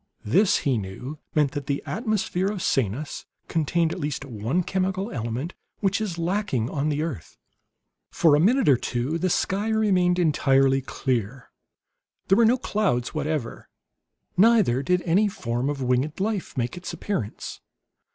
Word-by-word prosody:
This, 195 - +4
he 130 -5 +2
knew, 125 +10 -7 0.2
meant 150 -3 +3
that 140 0 -5
the 140 0 -1
atmosphere 210 -3 -1
of 200 -3 -3
Sanus 135 +4 -1 0.2
contained 165 +1 +1
at - - -6
least 145 -1 -3
one 125 - -1
chemical 190 +3 -1
element 120 +7 -3 0.3
which 200 +1 +1
is 190 -6 -3
lacking 170 - -1
on 145 +1 -1
the 150 +1 0
earth. 145 - -6 0.7
For 160 -3 +4
a - - +3
minute 235 - +3
or 135 -4 +6
two 125 +8 -2
the 185 +2 +1
sky 195 +4 0
remained 190 -5 +2
entirely 135 -5 +3
clear. 125 -2 -3 0.8
There 195 - +5
were 230 - +6
no 240 +3 +4
clouds 200 - -1
whatever; 150 -5 -3 0.7
neither 205 - +4
did 180 +5 +1
any 190 +5 +3
form 125 - -2
of 140 -2 -3
winged 130 +6 0
life 205 -5 -2
make 120 -1 -1
its 180 0 -6
appearance. 155 - -4
155 Hz, 150 wpm, -25 LUFS, 130-190 Hz, 0.8 s, or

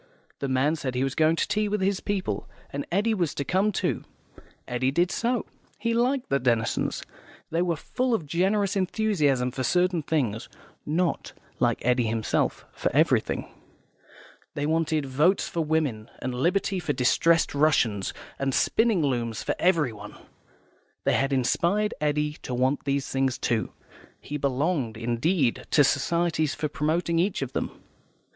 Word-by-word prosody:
The 140 - -2
man 135 +4 +2
said 130 -5 -4
he 125 - +1
was 135 -1 -1
going 160 +2 +3
to - - 0
tea 215 0 0
with 210 +1 0
his 190 0 +1
people, 185 - -3 0.2
and 140 0 -4
Eddy 210 +5 +2
was 175 -7 -1
to 140 - -1
come 195 +4 +2
too. - - -1 0.6
Eddy 125 +1 0
did 175 +6 +1
so. 240 -1 0 0.3
He 230 +2 -1
liked 250 +3 +1
the 140 - +3
Denisons; 120 -3 0 0.5
they 165 +2 +1
were 175 -2 +1
full 250 - -1
of 170 - -3
generous 195 +6 +1
enthusiasm 175 - +1
for 130 - -4
certain 180 +5 +2
things 130 -8 -1 0.4
(not, 170 +3 -1 0.3
like - - +1
Eddy 125 -1 +3
himself, 110 0 -1
for - - -2
everything). - - +2 1.1
They 145 - -1
wanted 155 -1 +1
Votes 150 +9 +2
for 170 - -2
Women, 150 -9 -1
and 130 - -4
Liberty 185 +8 +1
for 160 -4 -1
Distressed 165 +6 +3
Russians, 130 -9 +2 0.3
and 135 -1 0
spinning 225 -7 +2
looms 120 -5 -1
for - - 0
everyone. 130 - 0 0.9
They - - +2
had 135 +1 +1
inspired 170 +11 +1
Eddy 150 0 0
to 125 - -4
want 130 +4 +1
these 140 -1 0
things, 135 -1 +1
too; 115 -2 -1 0.5
he 150 - -5
belonged, 140 -3 0
indeed, 120 +4 0
to 145 - +5
societies 160 +2 +1
for 150 - -1
promoting 160 +4 0
each 180 -4 0
of 130 - -6
them. - - -1
150 Hz, 155 wpm, -26 LUFS, 130-180 Hz, 1.1 s, to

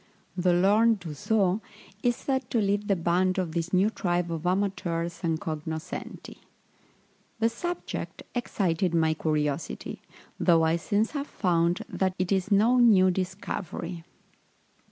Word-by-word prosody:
The 180 -1 +2
learned 210 +4 +4
Dusaux 185 +5 0 0.4
is 240 +1 +2
said 265 0 -2
to - - 0
lead 205 0 0
the 195 - +3
band 180 +2 +1
of 180 -4 -1
this 170 +1 -2
new 195 +4 +3
tribe 175 -4 -1
of 165 +1 -3
amateurs 180 -3 -1
and 165 -3 0
cognoscenti. 160 0 -6 1.0
The 225 0 +2
subject 350 +10 -5
excited 185 -7 0
my 160 -1 +3
curiosity, 150 - -2 0.4
though 165 -2 +4
I 160 +1 +2
since 205 +5 0
have 285 -1 -3
found 170 -2 +1
that 190 -1 -1
it 185 +1 -1
is 190 0 +1
no 225 +5 +4
new 195 -6 +6
discovery. 185 -2 -4
185 Hz, 135 wpm, -27 LUFS, 165-205 Hz, 1.0 s, new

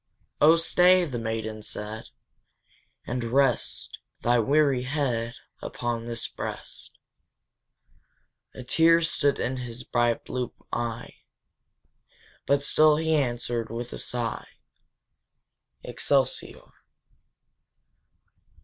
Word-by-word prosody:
"Oh 155 +2 +8
stay," 180 +2 +4
the 125 -7 -4
maiden 110 -1 -3
said, 105 +1 -6 1.0
"and 125 0 -3
rest 130 +1 0 0.2
Thy 120 0 +4
weary 140 +1 +3
head 125 -5 -1 0.3
upon 120 -1 -3
this 115 0 -3
breast!" - - -6 1.7
A 130 - -7
tear 165 +6 +4
stood 145 -3 +1
in 130 +2 -2
his 125 0 -6
bright 120 -2 0
blue 125 -1 -3 0.2
eye, 120 0 -4 1.3
But 140 0 +3
still 155 +1 +5
he 160 0 +1
answered, 120 -4 -1
with 120 +2 -5
a - - -5
sigh, 120 -2 -3 1.4
Excelsior! - - 0
125 Hz, 95 wpm, -26 LUFS, 115-145 Hz, 1.7 s, Oh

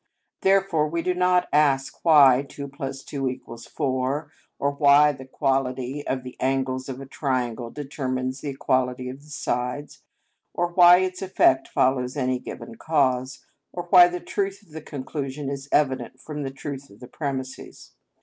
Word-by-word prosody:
Therefore 190 -5 +3
we 165 +2 -2
do 180 - +1
not 180 0 +2
ask 140 -2 +2
why 140 -6 +7
2 140 -1 -7 0.2
+ 135 0 -8
2 130 -3 -3 0.2
= 115 - -13
4; 135 +1 -2 0.3
or 140 - 0
why 145 +1 +5
the 130 -2 -10
equality 130 +1 -2
of 130 -1 -2
the 125 - -9
angles 130 0 -1
of 130 0 -5
a 135 - -8
triangle 125 -4 -2
determines 130 -2 -4
the 145 - -4
equality 130 -1 -1
of 130 +2 -9
the 150 - -18
sides; 125 0 -3 0.5
or 175 0 0
why 175 0 +7
its 185 -1 -3
effect 185 -8 +3
follows 130 +1 0
any 130 -2 0
given 230 - -9
cause; 130 -4 0 0.3
or 175 - -5
why 180 -2 +9
the 180 0 -4
truth 200 +2 -3
of 195 - -25
the 160 +1 -7
conclusion 140 -1 -5
is 140 0 -6
evident 130 -5 0
from 150 -1 -6
the 135 - -3
truth 135 0 -7
of 100 - -17
the 125 - -10
premises. 130 -2 -6
135 Hz, 165 wpm, -24 LUFS, 130-150 Hz, 0.5 s, why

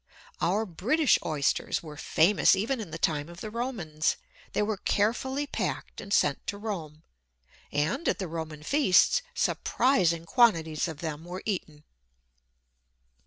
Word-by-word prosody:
Our 200 +6 +1
British 240 - +2
Oysters 150 0 0
were 155 -2 -9
famous 170 +7 +4
even 230 +7 -1
in 210 -6 -6
the 160 - -6
time 155 -1 0
of 170 0 -11
the 215 - -6
Romans; 200 -11 -1 0.4
they - - +1
were 210 -1 -1
carefully 265 +9 0
packed - - -4
and 200 - -10
sent 145 -8 +2
to 200 - -3
Rome, 165 -8 -6 0.7
and, 160 - 0
at - - +1
the 190 -2 -4
Roman 160 -2 -6
feasts, 285 - +4
surprising 175 -11 +1
quantities 165 -8 +3
of 160 -3 -7
them 160 -2 -4
were 180 +2 -7
eaten. 155 -8 -4
180 Hz, 140 wpm, -28 LUFS, 155-220 Hz, 0.7 s, famous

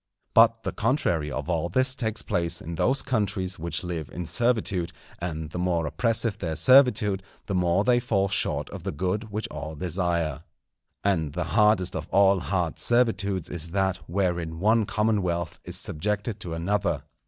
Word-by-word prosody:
But 115 0 +5
the - - -2
contrary 95 - 0
of 75 +3 -4
all 85 -1 -1
this 130 +8 +2
takes 110 -4 -2
place 85 -4 0
in 85 - -7
those 130 +11 +2
countries 100 -7 -1
which 85 +3 -3
live 85 -4 -4
in 90 - -6
servitude, 110 -5 +1 0.3
and 80 -3 -4
the 90 - -4
more 90 -2 0
oppressive 115 - +1
their 80 -4 -3
servitude, 110 - +5 0.2
the 100 - -3
more 90 +1 +2
they 125 0 +3
fall 105 -5 +1
short 100 - 0
of - - -7
the - - -3
good 95 +7 -2
which 105 +1 -3
all 80 +1 -6
desire. 85 -3 -1 0.6
And 80 -7 0
the 90 - -1
hardest 105 -4 +3
of - - -4
all 100 -1 +4
hard 90 -2 -2
servitudes 100 -7 +1
is 85 -1 -2
that 95 -1 +1
wherein 85 -3 -1
one 110 +2 +3
commonwealth 90 -6 -1
is - - -3
subjected 105 +5 -2
to 85 -5 -5
another. 100 +3 -1
95 Hz, 165 wpm, -26 LUFS, 85-110 Hz, 0.6 s, But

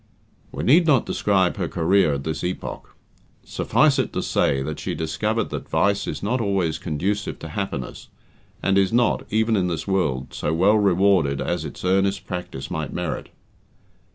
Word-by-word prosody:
We - - -5
need 165 +6 +5
not 135 -6 +4
describe 95 -2 +1
her 90 -4 -1
career 85 -2 +2
at 70 - -5
this 80 +1 -3
epoch. 90 +1 -5 0.5
Suffice - - +2
it - - 0
to - - -2
say 70 -1 +1
that 75 +1 -5
she - - -3
discovered 105 +8 -1
that - - -6
vice 100 0 +1
is - - -5
not 120 +5 0
always 95 -7 0
conducive 95 +7 -2
to - - -8
happiness, 95 - -5 0.6
and 100 0 +3
is 95 -1 +2
not, 120 +1 +2
even 110 +1 +2
in 95 -3 +1
this 85 -3 -3
world, 75 -10 -1
so 80 - -1
well 100 +6 +4
rewarded 95 -7 +3
as 85 -2 -2
its 75 - -7
earnest 95 +1 +1
practice 90 -7 -6
might 80 -5 -3
merit. 90 -3 -4
95 Hz, 170 wpm, -23 LUFS, 80-100 Hz, 0.6 s, need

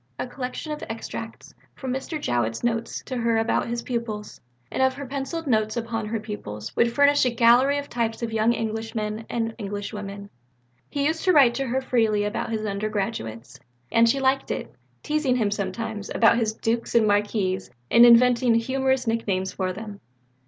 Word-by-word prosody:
A - - -2
collection 255 +4 -5
of 300 - -5
extracts 225 0 -7 0.2
from 260 -2 -4
Mr. 270 +4 -4
Jowett's 120 - -1
notes 230 -1 -2
to 255 - -5
her 230 -1 +1
about 225 +1 +1
his 235 0 -3
pupils, 225 -4 -4 0.3
and - - -1
of 260 0 +3
her 280 - -6
pencilled 280 +5 -4
notes 215 -4 +1
upon 225 -2 -3
her 225 +1 -2
pupils, 110 - -7
would 235 0 +3
furnish 285 +3 +4
a 255 - +3
gallery 240 +4 +4
of 285 0 -4
types 230 -2 -2
of 225 -1 -3
young 220 +1 +3
English 225 -1 -3
men 215 +1 -3
and 225 -1 -2
English 205 0 -5
women. 200 -1 -7 0.6
He 280 -1 -1
used 320 +2 0
to 365 - +5
write 270 -6 +6
to 270 +1 -2
her 240 - -3
very 260 - -17
freely 220 -4 +2
about 205 0 -2
his 220 -1 -2
undergraduates; 200 - -3 0.3
and 230 0 +5
she 275 - +2
liked 270 0 +1
it - - -4 0.3
teasing 300 -4 +1
him 215 -5 +1
sometimes 205 +1 -4
about 230 0 +4
his 220 -2 0
dukes 230 +2 -2
and 230 -2 +5
marquises 205 -2 0 0.2
and 235 - +8
inventing 240 0 +6
humorous 265 +2 +1
nicknames 200 -5 -1
for 185 -1 -2
them. 205 +1 -8
230 Hz, 185 wpm, -24 LUFS, 210-250 Hz, 0.6 s, and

